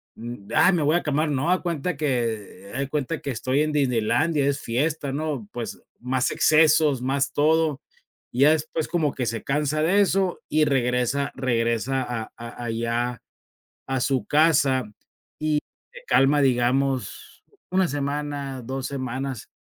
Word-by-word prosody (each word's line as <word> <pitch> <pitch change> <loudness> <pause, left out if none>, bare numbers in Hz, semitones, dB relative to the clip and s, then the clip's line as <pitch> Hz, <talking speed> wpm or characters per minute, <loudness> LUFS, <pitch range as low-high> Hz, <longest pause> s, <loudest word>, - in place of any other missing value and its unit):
um. 115 -3 -8
"Ah, 160 +4 +6
me 170 - +1
voy 150 +3 +3
a - - -3
calmar", 150 +1 0
no, 145 +3 0
haga 185 - +4
de - - -14
cuenta 170 -1 -2
que, 115 -9 -2
eh, - - -4
de 140 0 -2
cuenta 150 +2 -2
que 140 -3 -3
estoy 130 +4 0
en 155 0 0
Disneylandia, 140 +3 +1
es 140 0 0
fiesta, 145 +4 -1
¿no?, 145 -7 -3
pues, 120 -2 -6 0.2
más 125 +1 0
excesos, 155 -3 +4
más 135 +2 0
todo 155 -1 +2 0.5
y 125 - -1
ya 150 - +7
después, 160 0 -1
como 155 -5 0
que 125 - -2
se 115 -1 -3
cansa 150 +2 0
de 190 +6 +3
eso, 190 -2 +1
y 155 0 +3
regresa 135 +1 0
regresa 120 0 0
a 115 -3 -5
a 120 +1 -8
allá 115 +1 -2 0.7
a 135 -1 -1
su 130 0 0
casa 145 -4 +3
y 105 - -26 0.9
se - - -24
calma, 140 +2 +4
digamos 130 +1 0 0.3
1 185 0 +3
semana, 140 -2 -3
2 130 +2 -4
semanas, 130 -2 -4
140 Hz, 160 wpm, -24 LUFS, 125-155 Hz, 0.9 s, ya